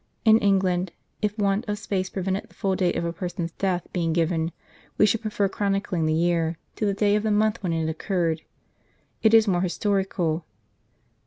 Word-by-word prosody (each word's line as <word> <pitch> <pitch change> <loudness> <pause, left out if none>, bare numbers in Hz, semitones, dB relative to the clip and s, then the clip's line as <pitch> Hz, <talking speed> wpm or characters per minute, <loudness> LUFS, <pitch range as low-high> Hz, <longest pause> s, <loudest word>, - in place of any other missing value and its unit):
In 220 0 +7
England, 185 -3 +1 0.3
if 210 0 -1
want 200 +1 +1
of 210 - -1
space 195 -3 -2
prevented 190 0 -2
the - - -22
full 190 -1 0
date 185 -2 +1
of 170 - -1
a 170 - -2
person's 175 -2 -4
death 180 -1 -1
being 165 -3 0
given, 165 0 +1 0.5
we - - +6
should 215 +2 +1
prefer 210 -2 0
chronicling 195 -4 -1
the 155 - +2
year, 165 -1 +1 0.2
to 215 - 0
the 200 - +1
day 205 0 +3
of 210 - +2
the 220 - -1
month, 215 +1 +2
when 180 -3 -1
it 165 -1 0
occurred. 165 0 -1 0.8
It 220 0 +5
is 225 -1 +6
more 180 -3 +2
historical. 185 -3 0
190 Hz, 185 wpm, -25 LUFS, 170-205 Hz, 0.8 s, In